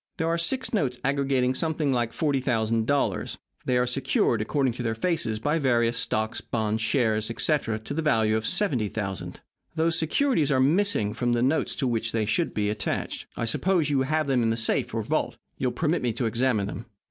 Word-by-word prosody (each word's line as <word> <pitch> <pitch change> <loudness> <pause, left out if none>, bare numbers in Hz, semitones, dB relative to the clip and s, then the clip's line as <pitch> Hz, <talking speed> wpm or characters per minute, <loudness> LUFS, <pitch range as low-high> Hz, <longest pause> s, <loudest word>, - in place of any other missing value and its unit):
Here 160 - -1
are 165 +1 +1
six 245 +12 -1
notes 130 - 0
aggregating 135 -2 +1
something 155 -1 0
like 120 -2 0
$40,000. 125 -3 0 0.3
They 125 - +2
are 125 - +2
secured, 125 -3 +1
according 130 +2 0
to 125 - -6
their 115 -2 -1
faces, 115 -5 0
by 150 +9 0
various 120 -4 +2
stocks, 110 -1 -1
bonds, 110 -1 -2
shares, 110 -2 +1
etc. 115 -2 0
to 110 +6 -7
the 160 - -1
value 110 -8 +2
of 110 - -1
$70,000. 110 - -1 0.4
Those 160 0 +2
securities 165 - +1
are 130 - +3
missing 145 - +2
from 120 -1 0
the 120 0 +1
notes 140 +5 +1
to 135 - -1
which 115 -2 -1
they 110 -2 +1
should 135 +11 0
be 105 -1 0
attached. 105 -2 -3
I 115 - -1
suppose 160 +5 +1
you 135 -2 +2
have 155 +3 0
them 135 -3 +1
in 115 - +2
the 115 - 0
safe 115 - 0
or - - -1
vault. - - -1 0.2
You - - +1
will - - 0
permit 165 +1 0
me 120 -2 0
to 120 - -2
examine 115 -2 +1
them." 110 +4 -7
125 Hz, 195 wpm, -26 LUFS, 110-150 Hz, 0.4 s, are